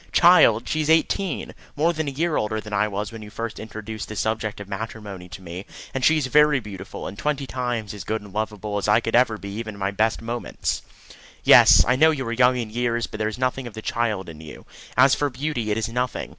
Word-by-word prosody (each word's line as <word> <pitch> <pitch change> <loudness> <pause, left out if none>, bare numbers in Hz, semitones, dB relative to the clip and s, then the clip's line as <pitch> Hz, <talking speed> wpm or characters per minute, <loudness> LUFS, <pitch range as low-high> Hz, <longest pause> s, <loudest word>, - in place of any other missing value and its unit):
"Child! 170 -10 +6
She 155 - 0
is 155 - -2
eighteen. 165 +3 +1 0.2
More 160 +4 +2
than 160 -2 -3
a - - -1
year 160 +3 -1
older 110 +1 -1
than 105 -1 -8
I 100 +1 +2
was 105 +1 -4
when 115 -1 -9
you 105 - -9
first 115 +1 -5
introduced 110 0 -7
the 110 - -6
subject 110 +1 -2
of 100 - -8
matrimony 100 -3 -7
to 90 +2 -10
me, 90 +3 -8 0.3
and 135 - -3
she 160 +3 +5
is 150 - 0
very 150 +1 +4
beautiful, 100 -4 -8
and 95 - -6
twenty 145 -2 -1
times 120 -5 -3
as 105 - -7
good 110 +1 -2
and 105 -2 -14
lovable 105 -1 -3
as 100 - -3
I 105 - +5
could 115 - -2
ever 120 -3 +3
be 100 - -8
even 110 +1 -6
in - - -12
my 95 0 -1
best 110 +3 +1
moments." 120 +1 -3 0.6
"Yes, - - +8
I 125 - +3
know 160 +3 +6
you 140 -5 -1
are 115 - -2
young 125 +1 +4
in 115 -3 -4
years, 120 0 0
but 110 - -9
there 110 0 0
is 110 - -7
nothing 130 0 -1
of 115 - -10
the 110 - -6
child 110 -5 -1
in 80 -2 -10
you. 75 -2 -11 0.3
As 130 +2 +6
for 145 - +1
beauty, 130 -4 -3
it 105 - 0
is 110 - -1
nothing. 125 +2 -3
115 Hz, 245 wpm, -23 LUFS, 105-130 Hz, 0.6 s, Yes